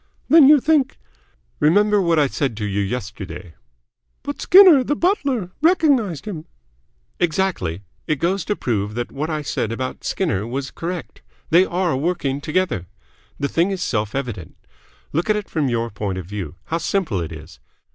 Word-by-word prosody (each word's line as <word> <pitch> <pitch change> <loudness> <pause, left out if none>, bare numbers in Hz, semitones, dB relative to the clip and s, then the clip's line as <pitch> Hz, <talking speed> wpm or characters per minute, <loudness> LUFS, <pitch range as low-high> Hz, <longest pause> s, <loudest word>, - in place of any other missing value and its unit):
"Then 305 -3 +8
you 300 -1 +7
think 280 -1 +1 0.3
?" - - -41
"Remember 205 +6 +4
what 170 -3 +2
I 150 - +4
said 135 -4 -2
to 105 - -3
you 100 0 -1
yesterday." 95 -5 -5 0.7
"But 285 +1 -5
Skinner 360 -8 +8
the 290 - -1
butler 280 - 0
recognised 280 - +2
him?" 170 -7 -6 0.7
"Exactly. 155 - -1 0.2
It 155 - +1
goes 175 +6 -1
to 210 - -1
prove 105 - -2
that 120 0 -3
what 150 +4 -3
I 155 -2 -2
said 115 -4 -2
about 130 +2 -4
Skinner 110 - -1
was 135 +3 -4
correct. 175 0 -6 0.3
They 175 +3 +6
are 175 -3 0
working 140 -2 -1
together. 155 - -1 0.5
The 140 - 0
thing 170 +6 +1
is 190 -2 -2
self 105 - -2
evident. 120 - -5 0.6
Look 170 +7 -1
at 215 - +4
it 210 -1 -3
from 150 -5 0
your 115 -1 -1
point 100 -1 -4
of 95 - -5
view. 90 -5 -6
How 165 - -2
simple 165 - -1
it 80 - -5
is. - - -11
155 Hz, 170 wpm, -21 LUFS, -, 0.7 s, Then